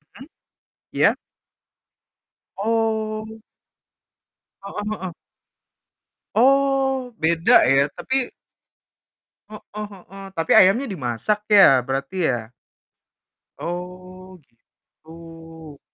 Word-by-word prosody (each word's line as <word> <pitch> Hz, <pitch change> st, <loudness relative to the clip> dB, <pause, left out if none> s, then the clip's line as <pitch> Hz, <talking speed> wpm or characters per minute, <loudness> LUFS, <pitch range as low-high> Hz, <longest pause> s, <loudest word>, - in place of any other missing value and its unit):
Mhm, 265 Hz, -, -12 dB, 0.7 s
iya? -, -, +3 dB, 1.4 s
Oh. 220 Hz, 0 st, -2 dB, 1.2 s
Heeh 200 Hz, +1 st, -6 dB, 0.2 s
heeh. 185 Hz, -2 st, -6 dB, 1.2 s
Oh, 270 Hz, +1 st, +2 dB
beda 165 Hz, -1 st, +4 dB
ya, 135 Hz, +2 st, +3 dB
tapi 260 Hz, -1 st, -1 dB, 1.2 s
Heeh 210 Hz, 0 st, -8 dB
heeh. 195 Hz, +1 st, -13 dB
Tapi 165 Hz, 0 st, -1 dB
ayamnya 200 Hz, +9 st, +5 dB
dimasak 185 Hz, -, -2 dB
ya, 195 Hz, -11 st, +7 dB
berarti 135 Hz, +8 st, -2 dB
ya? 120 Hz, -2 st, -4 dB, 1.1 s
Oh, 185 Hz, +1 st, -8 dB
gitu. 165 Hz, +4 st, -16 dB
185 Hz, 70 wpm, -22 LUFS, 165-220 Hz, 1.4 s, ya